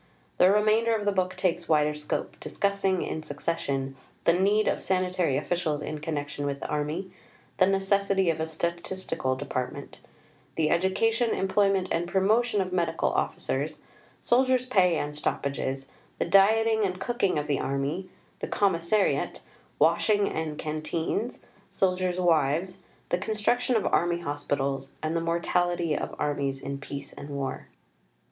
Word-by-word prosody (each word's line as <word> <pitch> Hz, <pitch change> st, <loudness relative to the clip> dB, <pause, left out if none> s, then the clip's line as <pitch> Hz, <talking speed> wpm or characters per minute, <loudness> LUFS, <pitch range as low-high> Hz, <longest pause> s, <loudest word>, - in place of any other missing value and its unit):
The 185 Hz, -, +7 dB
remainder 215 Hz, +2 st, +3 dB
of 210 Hz, -2 st, -3 dB
the 205 Hz, -, +3 dB
book 185 Hz, -1 st, 0 dB
takes 175 Hz, -2 st, -1 dB
wider 150 Hz, -1 st, +3 dB
scope, 150 Hz, 0 st, -3 dB
discussing, 200 Hz, -2 st, 0 dB
in 160 Hz, -, -3 dB
succession, 140 Hz, -3 st, -3 dB, 0.3 s
the 170 Hz, -, +5 dB
Need 200 Hz, +4 st, +3 dB
of -, -, 0 dB
Sanitary 185 Hz, -6 st, +1 dB
Officials 155 Hz, -1 st, -1 dB
in 150 Hz, +1 st, -5 dB
connection 145 Hz, -2 st, -4 dB
with 140 Hz, 0 st, -3 dB
the -, -, -6 dB
Army; 150 Hz, +5 st, -2 dB, 0.5 s
the 185 Hz, -, +5 dB
Necessity 195 Hz, -1 st, +2 dB
of 160 Hz, -, -5 dB
a 160 Hz, -, -1 dB
Statistical 170 Hz, -4 st, -2 dB
Department; 130 Hz, -2 st, -5 dB, 0.6 s
the 155 Hz, -1 st, +1 dB
Education, 225 Hz, +6 st, +2 dB
Employment 195 Hz, -1 st, +2 dB
and 170 Hz, +1 st, 0 dB
Promotion 210 Hz, +4 st, +2 dB
of 185 Hz, -1 st, -3 dB
Medical 175 Hz, -2 st, +1 dB
Officers; -, -, -2 dB, 0.4 s
Soldiers' 255 Hz, +1 st, +3 dB
Pay 185 Hz, -9 st, +3 dB
and 145 Hz, 0 st, -3 dB
Stoppages; 135 Hz, -2 st, -2 dB, 0.3 s
the -, -, 0 dB
Dieting 220 Hz, +4 st, +4 dB
and 185 Hz, -2 st, -1 dB
Cooking 200 Hz, -4 st, 0 dB
of 150 Hz, -, -1 dB
the 145 Hz, -2 st, 0 dB
Army; 140 Hz, +7 st, -2 dB, 0.3 s
the -, -, -3 dB
Commissariat; 195 Hz, +1 st, +1 dB, 0.4 s
Washing 205 Hz, -2 st, +3 dB
and 155 Hz, -2 st, -3 dB
Canteens; 160 Hz, +8 st, -2 dB, 0.3 s
Soldiers' 185 Hz, -1 st, 0 dB
Wives; 170 Hz, +2 st, +2 dB, 0.3 s
the 175 Hz, -, +1 dB
Construction 240 Hz, +5 st, +1 dB
of 220 Hz, -, +1 dB
Army 175 Hz, 0 st, +1 dB
Hospitals; 140 Hz, -3 st, -2 dB
and 155 Hz, +1 st, -1 dB
the 165 Hz, -, +1 dB
Mortality 170 Hz, -1 st, 0 dB
of -, -, -4 dB
Armies 140 Hz, -2 st, -1 dB
in 140 Hz, +1 st, -5 dB
Peace 140 Hz, 0 st, -7 dB
and 140 Hz, -, -9 dB
War. 140 Hz, -2 st, -4 dB
175 Hz, 140 wpm, -27 LUFS, 150-195 Hz, 0.6 s, The